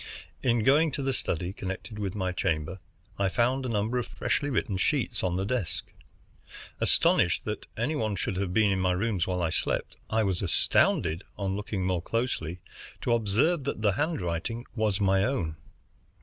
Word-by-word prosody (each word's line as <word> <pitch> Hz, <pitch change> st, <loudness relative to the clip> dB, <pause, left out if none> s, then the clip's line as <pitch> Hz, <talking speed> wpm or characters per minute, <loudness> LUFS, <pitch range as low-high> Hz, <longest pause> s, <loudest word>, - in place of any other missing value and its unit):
In 120 Hz, -3 st, +2 dB
going 145 Hz, +7 st, +5 dB
into 140 Hz, -2 st, -3 dB
the 135 Hz, 0 st, +1 dB
study 90 Hz, -5 st, -2 dB
connected 100 Hz, +3 st, -6 dB
with 100 Hz, -2 st, -3 dB
my 95 Hz, -3 st, -1 dB
chamber, 90 Hz, 0 st, -1 dB, 0.4 s
I 100 Hz, -1 st, +2 dB
found 125 Hz, +5 st, +1 dB
a -, -, -3 dB
number 110 Hz, +3 st, 0 dB
of 120 Hz, -, -3 dB
freshly 145 Hz, -, -1 dB
written 120 Hz, -6 st, 0 dB
sheets 90 Hz, -, +1 dB
on 90 Hz, -2 st, +1 dB
the 95 Hz, +1 st, -1 dB
desk. 105 Hz, -6 st, -2 dB, 0.9 s
Astonished -, -, +3 dB
that -, -, -4 dB
any 125 Hz, +8 st, 0 dB
one 110 Hz, -6 st, 0 dB
should 95 Hz, 0 st, -2 dB
have 95 Hz, -2 st, -1 dB
been 105 Hz, +1 st, +4 dB
in 95 Hz, -1 st, +1 dB
my 90 Hz, 0 st, +2 dB
rooms 95 Hz, -1 st, 0 dB
while 90 Hz, -1 st, -1 dB
I 80 Hz, -, +1 dB
slept, -, -, -2 dB
I 110 Hz, 0 st, +2 dB
was 95 Hz, -3 st, 0 dB
astounded, 85 Hz, -1 st, +3 dB
on 95 Hz, -1 st, -1 dB
looking 100 Hz, -2 st, -3 dB
more 90 Hz, -2 st, 0 dB
closely, 90 Hz, -6 st, -2 dB, 0.4 s
to 120 Hz, -, +1 dB
observe 120 Hz, -, +2 dB
that 140 Hz, -6 st, -3 dB
the 105 Hz, -, +5 dB
handwriting 115 Hz, -, -2 dB
was 110 Hz, -3 st, +1 dB
my 95 Hz, -1 st, +3 dB
own. 95 Hz, -, -1 dB
100 Hz, 175 wpm, -28 LUFS, 90-120 Hz, 0.9 s, going